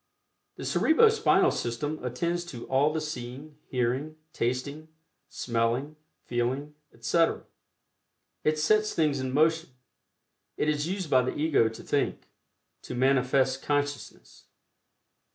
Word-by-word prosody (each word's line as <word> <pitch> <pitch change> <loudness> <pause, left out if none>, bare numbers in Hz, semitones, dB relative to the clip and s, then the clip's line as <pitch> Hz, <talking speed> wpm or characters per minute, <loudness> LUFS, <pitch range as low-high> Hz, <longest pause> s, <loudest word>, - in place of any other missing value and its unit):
The - - -7
Cerebro 435 +8 +5
Spinal 440 -1 +3
System 145 +6 -3
attends 170 +8 -2
to 125 -9 -8
all 140 +3 +2
the 160 - -1
seeing, 145 0 -7
hearing, 130 +5 -1 0.2
tasting, 140 +5 -2 0.4
smelling, 120 +5 -1 0.3
feeling, 130 +5 -2 0.2
etc. 165 -1 +1 1.0
It 155 0 +2
sets 215 +8 +2
things 150 -4 +1
in 130 0 -3
motion; 160 +4 +2 0.9
it - - 0
is 150 0 0
used 185 -3 -3
by 130 - +6
the 125 - -3
Ego 145 -7 +3
to 110 - -11
think - - -1 0.5
to - - -7
manifest 130 +1 +2
consciousness. 145 -1 -3
145 Hz, 115 wpm, -28 LUFS, 125-155 Hz, 1.0 s, by